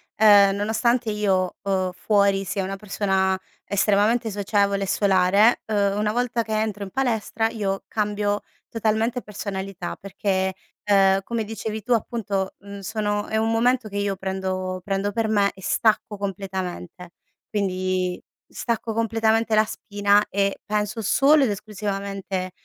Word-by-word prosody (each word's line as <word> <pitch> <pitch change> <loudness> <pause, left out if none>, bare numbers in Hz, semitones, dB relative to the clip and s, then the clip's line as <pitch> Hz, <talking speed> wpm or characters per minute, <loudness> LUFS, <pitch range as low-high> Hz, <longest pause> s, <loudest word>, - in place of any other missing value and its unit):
ehm, 205 -2 +6
nonostante 225 +3 +1
io, 190 -3 0
uhm, 190 -2 0
fuori 200 0 +2
sia 195 +2 -2
una 195 +1 -4
persona 190 -2 0 0.2
estremamente 210 +3 +2
socievole 200 0 +1
e - - -3
solare, 195 +3 +4
uhm, 200 -2 +1
una 210 0 +1
volta 240 0 0
che 220 -1 -1
entro 210 -2 -2
in 195 - -6
palestra 225 -2 0
io 195 -4 -2
cambio 205 -1 -1 0.3
totalmente 225 +2 0
personalità 195 -3 -5
perché, 190 -1 -1 0.3
ehm, 195 -1 +4
come 230 0 -2
dicevi 220 0 -5
tu 250 - -6
appunto, 205 -4 -2
mhmm, 200 0 -10
sono 205 0 -2
è 220 - -1
un 225 +1 +1
momento 240 0 +2
che 205 - -6
io 200 -1 0
prendo 185 -1 -3
prendo 200 +1 -1
per 225 +1 0
me 205 -2 +2
e 190 - -15
stacco 215 +1 +1
completamente. 185 -3 -5 0.4
Quindi 185 -3 -1 0.3
stacco 230 -1 -3
completamente 225 0 +1
la 215 0 +6
spina 205 -1 +1
e 200 0 +1
penso 210 +1 -1
solo 280 +7 +5
ed 225 - +2
esclusivamente 195 -2 -4
205 Hz, 140 wpm, -23 LUFS, 195-220 Hz, 0.4 s, ehm